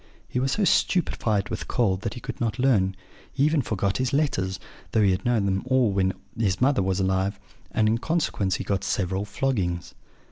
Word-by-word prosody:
He 125 - -2
was 135 +1 +1
so 210 - +1
stupefied 110 - +1
with - - -4
cold 100 -7 +1
that 115 +1 -4
he - - -6
could - - -7
not 110 -3 0
learn; 105 -8 +2 0.4
he 140 - 0
even 155 0 +3
forgot 100 -3 -1
his 130 0 0
letters, 95 -11 0 0.3
though 110 - +4
he 100 - +4
had 90 - -1
known 120 -4 +2
them 95 0 0
all 130 -4 +3
when 95 -1 +1 0.2
his 100 -5 0
mother 135 -1 +3
was 95 0 0
alive; 95 +1 0 0.3
and, 110 -1 +1
in 115 +2 +2
consequence, 120 - 0
he - - -3
got 100 -1 -1
several 95 +1 -1
floggings. 100 -6 -2
105 Hz, 200 wpm, -25 LUFS, 95-130 Hz, 0.4 s, though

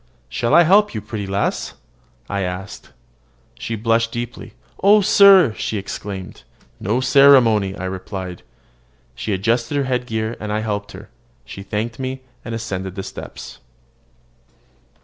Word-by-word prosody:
"Shall 115 - +1
I 170 - +8
help 200 - +4
you, - - -1
pretty 105 -1 -6
lass?" 100 +1 -2 0.5
said - - -10 0.3
I. 95 +2 -9 0.9
She 115 - -4
blushed 115 +1 +1
deeply. 120 0 -6 0.3
"Oh, 205 +2 +6
sir!" 195 - +6
she 110 - -3
exclaimed. 95 -4 -7 0.4
"No 115 +6 0
ceremony!" 125 -8 +5
I 95 - -5
replied. 95 -1 -6 0.7
She 85 - -5
adjusted 115 +7 0
her 140 - +1
head 125 -1 -2
gear, 110 0 -2
and 105 -1 -5
I 105 +1 -1
helped 105 -1 -4
her. - - -11 0.4
She 95 - -9
thanked 110 +4 -4
me, 130 0 -4 0.2
and 115 - -5
ascended 95 -5 -5
the 95 - -5
steps. - - -9
110 Hz, 140 wpm, -20 LUFS, 100-125 Hz, 0.9 s, I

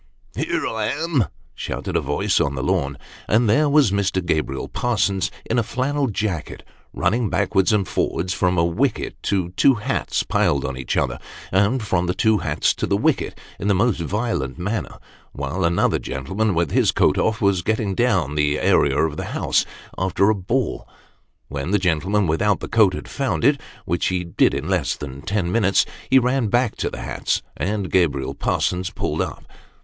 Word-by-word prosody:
"Here - - -1
I 110 -1 -1
am," 145 - 0 0.3
shouted - - -5
a - - +3
voice 75 +1 +1
on 70 0 0
the 65 - -3
lawn, 70 -5 0 0.3
and 115 +3 +3
there 145 +8 +3
was 145 -7 +4
Mr. 95 -2 0
Gabriel 75 -5 -1
Parsons 100 -7 0 0.2
in 120 - +1
a - - +3
flannel 135 +5 -1
jacket, 100 - -3 0.3
running 110 +4 0
backwards 95 +1 +2
and 105 -3 +1
forwards, 90 +2 -1
from 90 -1 +1
a 85 - +4
wicket 115 +9 -1
to 95 -3 0
two 130 +9 +4
hats 105 - -1
piled 70 -1 +1
on 65 - -3
each 65 -1 -3
other, - - 0 0.3
and 105 +6 +2
from 90 -4 0
the 90 - -1
two 110 -1 +3
hats 75 -3 +1
to - - -1
the - - +2
wicket, - - 0 0.2
in 100 - -3
the 100 - +3
most 105 0 +2
violent 85 - -2
manner, 105 +5 -3 0.4
while 70 +7 -3
another 85 0 +2
gentleman 95 +10 -2
with 85 -3 0
his - - +3
coat - - +2
off 110 0 +1
was 100 -4 +2
getting 110 0 -1
down 95 - +1
the 75 0 +1
area 70 -1 +3
of 80 0 +1
the - - -3
house, - - +1 0.3
after 95 +2 +2
a - - +1
ball. 115 +7 -2 0.6
When 70 +3 -4
the 105 - +3
gentleman 95 +3 +1
without 95 +6 +1
the - - -6
coat 105 -5 +4
had - - -7
found 115 - -2
it - - +4 0.2
which 85 +2 0
be 90 -1 -1
did 85 - +2
in - - -3
less - - 0
than 70 -1 -8
ten 90 +1 -1
minutes 100 -4 +3 0.2
he 130 - +6
ran 125 -1 +2
back 120 +2 +1
to - - -1
the - - -7
hats, - - -2
and 100 -1 -2
Gabriel 70 -7 +1
Parsons 90 +5 -1
pulled - - -2
up. - - -4
95 Hz, 185 wpm, -22 LUFS, 85-110 Hz, 0.6 s, he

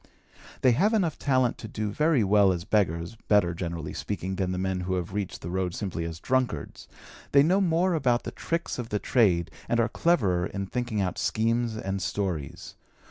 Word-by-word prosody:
They 130 - +5
have 200 - +3
enough 175 -7 0
talent 130 -3 +1
to 110 - -7
do 105 0 -3
very 150 0 +2
well 100 -1 +5
as 85 -2 -2
beggars, 85 -1 0
better, 100 -5 +4
generally 85 -2 -5
speaking, 95 +1 -4
then 95 -2 -1
the 90 - -2
men 95 0 -1
who 90 +1 -2
have 90 0 -4
reached 100 -2 -3
the 85 - -5
road 90 -1 -1
simply 90 -5 -3
as 85 -1 -6
drunkards; 125 - -2 0.5
they 140 0 +7
know 185 +6 +3
more 180 0 +2
about 125 -7 +1
the - - -5
tricks 165 -5 -3
of 115 -2 -5
the 105 - 0
trade 90 -8 +2 0.2
and 120 - +2
are 115 - +3
cleverer 95 - +2
in 100 0 -4
thinking 120 0 -2
out 90 -1 -2
schemes 115 0 0
and 95 -2 -3
stories. 90 -7 -3
105 Hz, 190 wpm, -27 LUFS, 90-125 Hz, 0.5 s, they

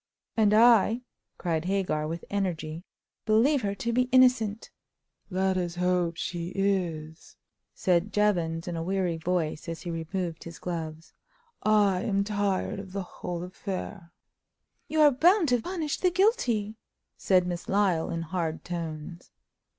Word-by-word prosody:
"And 215 -2 +4
I," 230 +1 +5 0.3
cried 165 -2 -1
Hagar, 185 -5 0
with 165 +1 -5
energy, 175 -5 -2 0.4
"believe 245 +6 +4
her 200 -2 -2
to 235 +3 -2
be 250 +1 +2
innocent!" 250 -4 +3 0.6
"Let 190 0 +1
us 175 -2 -2
hope 180 -1 0
she 170 -1 -3
is," 175 -5 -2 0.4
said 180 +2 +1
Jevons, 175 -6 +1
in 175 - -3
a 165 - -3
weary 180 -1 -1
voice, 165 -1 -2
as 165 0 -6
he 175 - -4
removed 165 +1 -4
his 170 -1 -9
gloves. 165 -2 -6 0.5
"I 205 -3 +3
am 200 -1 +1
tired 200 -2 -1
of 190 -2 -9
the 200 -1 -2
whole 175 -1 -6
affair." 185 -1 -6 0.8
"You 315 0 +1
are 295 -1 +7
bound 335 +5 +4
to 245 -2 +2
punish 325 -1 -3
the 365 - +3
guilty!" 250 - +1 0.4
said 185 -2 +2
Miss 175 -1 -5
Lyle, 195 -5 +2
in 165 0 -3
hard 165 -1 -3
tones. 170 -1 -6
185 Hz, 145 wpm, -28 LUFS, 170-215 Hz, 0.8 s, are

